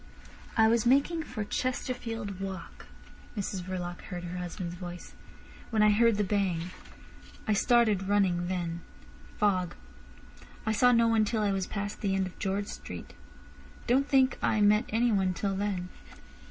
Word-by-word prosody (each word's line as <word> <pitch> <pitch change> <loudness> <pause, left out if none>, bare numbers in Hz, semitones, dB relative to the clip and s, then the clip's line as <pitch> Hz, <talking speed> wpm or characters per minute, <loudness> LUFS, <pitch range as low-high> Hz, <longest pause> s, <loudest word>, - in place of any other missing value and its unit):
"I 220 -1 +6
was 230 +1 +3
making 280 +6 +3
for 245 -8 -5
Chesterfield 230 -3 -3
Walk," 190 -3 -7 0.5
Mrs 195 -2 -2
Verloc 180 -1 -5
heard 175 -2 -6
her 180 +1 -5
husband's 175 0 -5
voice, 180 0 -8 0.6
"when 220 -2 +3
I 210 - +6
heard 230 +1 +4
the 210 - +2
bang. 185 -4 0 0.8
I 215 - +3
started 215 -3 +3
running 185 -4 +2
then. 175 -2 -3 0.6
Fog. 185 -4 +1 0.9
I 220 - +1
saw 245 +3 +5
no 235 -1 +4
one 225 -1 +4
till 215 0 0
I 205 - +2
was 195 -1 -1
past 205 0 -4
the 195 -2 +1
end 190 0 +1
of 185 - -9
George 200 0 -1
Street. 90 - -8 0.7
Don't 270 +4 +2
think 265 -1 +3
I 215 - +2
met 210 +3 +4
anyone 210 -5 +2
till 195 +1 -1
then." 190 -2 -2
205 Hz, 155 wpm, -29 LUFS, 185-225 Hz, 0.9 s, I